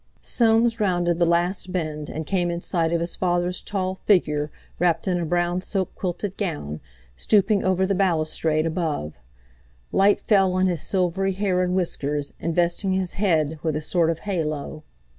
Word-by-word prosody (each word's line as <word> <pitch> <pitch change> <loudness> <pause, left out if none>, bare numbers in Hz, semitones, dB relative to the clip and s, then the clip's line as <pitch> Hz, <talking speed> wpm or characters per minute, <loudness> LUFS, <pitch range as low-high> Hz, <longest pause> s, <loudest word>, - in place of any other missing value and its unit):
Soames 230 0 +3
rounded 175 -4 +1
the 170 - +3
last 175 +2 0
bend 155 -4 -3
and 160 0 -5
came 175 +1 0
in 170 0 -2
sight 165 -2 0
of 170 -1 +1
his 170 - -2
father's 175 0 0
tall 185 -2 -2
figure 150 -7 +1 0.3
wrapped 170 0 +1
in 180 -1 +1
a 170 - -2
brown 175 +1 0
silk 190 0 -2
quilted 190 +2 -4
gown, 145 - -3 0.4
stooping 205 - +2
over 185 0 +2
the 200 - 0
balustrade 160 -4 +1
above. 160 - -2 0.8
Light 200 +1 +4
fell 195 -3 +3
on 185 0 +2
his 175 -5 0
silvery 190 +1 0
hair 185 -1 0
and 180 0 0
whiskers, 145 -5 -1
investing 175 +3 0
his 185 -1 -1
head 160 -6 +1
with 160 -3 -1
a 155 - -2
sort 165 +1 +1
of 165 - 0
halo. 155 -5 -3
175 Hz, 165 wpm, -24 LUFS, 160-190 Hz, 0.8 s, Light